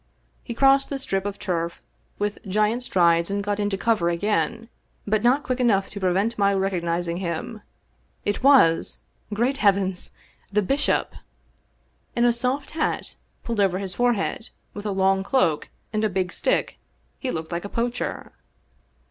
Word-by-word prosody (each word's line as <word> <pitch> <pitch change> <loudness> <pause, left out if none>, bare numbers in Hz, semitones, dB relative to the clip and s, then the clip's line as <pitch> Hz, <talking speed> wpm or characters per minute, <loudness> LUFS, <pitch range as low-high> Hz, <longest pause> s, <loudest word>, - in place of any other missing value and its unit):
He 235 - -6
crossed 275 +1 +4
the 280 - -2
strip 195 -7 -2
of 200 0 -5
turf 170 -3 -2 0.4
with 205 0 -2
giant 215 +5 +1
strides 170 -6 +3
and 200 0 -1
got 205 0 -1
into 205 -1 0
cover 205 -5 +1
again, 215 +5 -1 0.4
but 210 0 +1
not 255 +5 +3
quick 255 0 -2
enough 205 -6 +2
to 200 - -6
prevent 195 +5 0
me 200 - +4
recogniz 175 -3 -1
ing 170 0 -2
him. 180 +4 -4 0.6
It 205 - -1
was 255 -12 +5 0.2
— - - -39
^great 240 +6 +1
heavens! 195 -5 +1 0.2
— - - -36
^the 210 -2 +3
bishop! 280 +8 +1 1.0
In 235 - +3
a 240 - +4
soft 255 +4 -1
hat 315 -1 -2 0.3
pulled 230 -3 -3
over 190 -2 +3
his 190 -1 -3
forehead, 240 -2 0 0.2
with 205 +1 -6
a - - -1
long 190 0 +2
cloak 195 - +1 0.2
and 215 0 0
a 215 - +2
big 185 -1 -1
stick, - - 0 0.4
he 265 - -3
looked 160 -6 -4
like 170 0 -3
a 205 - -6
poacher. 240 +2 -3
205 Hz, 165 wpm, -24 LUFS, 185-235 Hz, 1.0 s, was